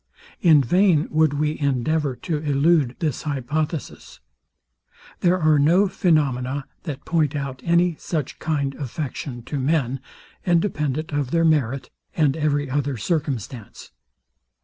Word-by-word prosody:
In 155 -5 +6
vain 175 - +3
would 155 -1 +3
we 150 +1 -1
endeavour 140 +1 0
to 165 -4 -1
elude 145 -2 +2
this 155 -5 -2
hypothesis. 150 +2 -4 1.0
There 180 +1 +2
are 155 -2 +4
no 175 +8 +4
phaenomena 140 -7 0 0.2
that 145 -5 -6
point 155 -4 +1
out 135 -2 -4
any 170 0 +2
such 155 -6 -4
kind 145 -4 -1
affection 135 -2 -5
to 145 +3 -4
men, 135 -2 0 0.4
independent 155 -4 0
of 145 -3 -1
their 165 +3 +2
merit, 135 -5 +1 0.2
and 150 -6 +2
every 145 -2 0
other 140 0 -1
circumstance. 130 - -4
150 Hz, 125 wpm, -23 LUFS, 135-160 Hz, 1.0 s, In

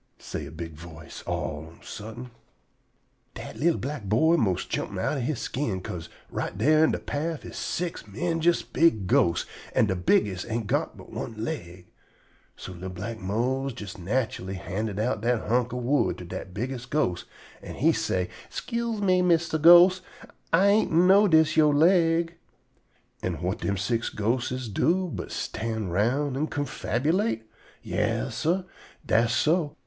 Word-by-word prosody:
_" - - -23
say - - -5
a - - -10
big 80 0 -7
voice 80 +1 -10
all 75 - -2
on 80 - -15
a - - -20
suddent. 115 +4 -8 1.0
Dat - - -8
li'l 165 +2 +2
black 135 -4 -5
boy 140 - +4
'most 100 - 0
jump - - -3
outen 135 -5 -1
he 150 +5 -1
skin, 115 -6 -2
'ca'se 85 -2 -7 0.2
right - - -3
dar 155 +8 +4
in 160 - +5
de - - 0
paff 155 +2 -4
is - - -9
six 170 -8 -3
'mendjus 165 - +1
big 155 - +2
ghosts, 85 -1 +2 0.3
an' - - +5
de 95 -3 -1
bigges' 95 +1 +2
ain't 115 0 -2
got - - -1
but - - -13
one 115 - -5
leg. 90 - -5 0.7
So - - -8
li'l 90 +2 -7
black 100 +5 -6
Mose 120 +7 -1
jes 100 -2 -6
natchully 95 -1 -2
handed 95 +4 -3
dat 110 0 -1 0.3
hunk 120 +2 +1
of 125 0 -4
wood 140 +4 +1
to - - -8
dat - - -7
bigges' 125 +5 -4
ghost, 90 -13 0 0.4
an' - - -8
he - - +3
say: 90 -1 -1 0.2
"'Scuse 235 -3 -3
me, 185 -2 +3
Mistah 170 -2 +2
Ghost; 175 +3 +8 0.5
Ah 165 +4 +5
ain't 205 +2 +4
know 190 +5 +6
dis 160 -3 +4
your 150 -2 +5
leg." 165 +1 +4 0.9
An' 90 -2 -2
whut 90 +6 -3
dem 100 -1 -1
six 115 +5 -1
ghostes 125 +3 -1
do 175 - +1
but - - -5
stand 110 -5 -3
round 130 +8 +1
an' 150 +3 0
confabulate? 145 - -1 0.4
Yas, - - -1
sah, 175 +4 0 0.4
dass 115 +1 +3
so. 155 +4 +1
125 Hz, 160 wpm, -26 LUFS, 100-160 Hz, 1.0 s, Ghost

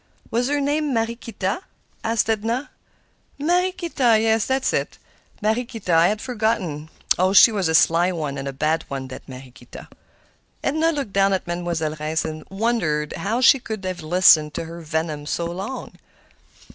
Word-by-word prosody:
"Was 240 +2 +1
her 290 0 +1
name 290 -1 0
Mariequita?" 225 - -2 0.4
asked 225 -1 +1
Edna. 225 +5 -1 0.7
"Mariequita—yes, 280 - +2
that 265 0 0
was - - +1
it; - - -2 0.5
Mariequita. 225 -3 -1
I 165 +1 +6
had 210 +2 -1
forgotten. 210 - -2 0.3
Oh, 185 +1 +3
she's 200 -3 +6
a 160 - +1
sly 170 +3 +4
one, 150 -5 -4
and 135 - -5
a - - -2
bad 155 +4 0
one, 135 -1 -5
that 130 - -10
Mariequita!" 125 -1 -12 0.7
Edna 315 +3 +1
looked 280 -10 -4
down 195 0 +3
at 190 - -1
Mademoiselle 170 -3 -3
Reisz 155 +1 -1
and 155 -1 -5
wondered 195 -8 -1
how 225 +5 -2
she 270 +1 +6
could 220 -5 -6
have 185 -2 -4
listened 155 -2 +5
to - - -3
her 170 +1 -9
venom 155 -2 -3
so 170 - -2
long. 190 +9 -6
195 Hz, 155 wpm, -22 LUFS, 160-235 Hz, 0.7 s, I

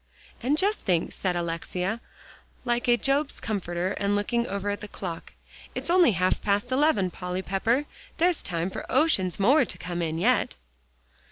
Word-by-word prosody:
"And 270 +5 +1
just 405 +5 +1
think," 175 -4 0
said 185 -2 -1
Alexia, 180 +5 -2 0.6
like 240 0 0
a 240 0 +5
Job's 275 +3 0
comforter, 185 -4 -2
and 200 0 0
looking 235 +4 0
over 200 +1 -2
at 205 - -4
the 210 - -6
clock, 175 -5 -7 0.4
"it's - - -2
only 350 - +6
half 180 +1 +1
past 205 +4 0
eleven. 255 - +3
Polly 180 +1 -4
Pepper, 230 +10 +1 0.3
there's 345 0 +2
time 175 +1 -2
for - - -6
oceans 195 - +2
more 265 +9 +5
to - - -5
come 175 -1 -4
in 160 -1 -1
yet." 240 +9 +2
205 Hz, 165 wpm, -27 LUFS, 180-250 Hz, 0.6 s, only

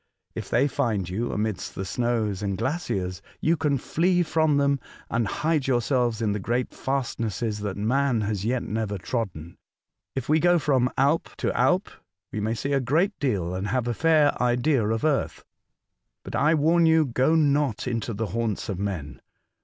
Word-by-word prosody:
If - - -6
they 130 +4 +3
find 115 -10 -1
you 105 +7 -2
amidst 105 -2 -3
the 95 - -4
snows 110 -2 -1
and 100 -2 -2
glaciers, 100 - -2 0.2
you 165 +2 +2
can 150 -3 +1
flee 175 +6 +1
from 155 -2 +2
them 140 -1 +2 0.3
and 115 -2 +1
hide 155 +5 0
yourselves 120 -2 +1
in 105 - +1
the 105 - -1
great 120 +5 -1
fastnesses 115 -5 -2
that 100 -2 -4
man 125 +3 +1
has 105 -2 -2
yet 120 +3 0
never 105 -2 -2
trodden. 90 -6 -4 0.6
If 135 -2 -3
we 155 +2 +4
go 175 +1 +4
from 135 -5 +2
Alp 140 +5 +2
to - - -1
Alp, 185 +3 +2 0.4
we 110 - -3
may 110 +2 -1
see 140 +5 -2
a 140 - +3
great 160 - +1
deal 100 -11 -1
and 95 +2 -3
have 120 +2 -1
a 120 - 0
fair 155 +1 +4
idea 125 0 +2
of 115 +6 -1
Earth. 150 -3 0 0.8
But - - -6
I 155 +3 +3
warn 165 +3 +4
you, 160 -1 +4
go 130 +5 +2
not 145 -6 +2
into 115 -1 -2
the 110 +2 -2
haunts 115 -3 -2
of 95 -3 -3
men 85 -9 -4
120 Hz, 175 wpm, -25 LUFS, 105-145 Hz, 0.8 s, we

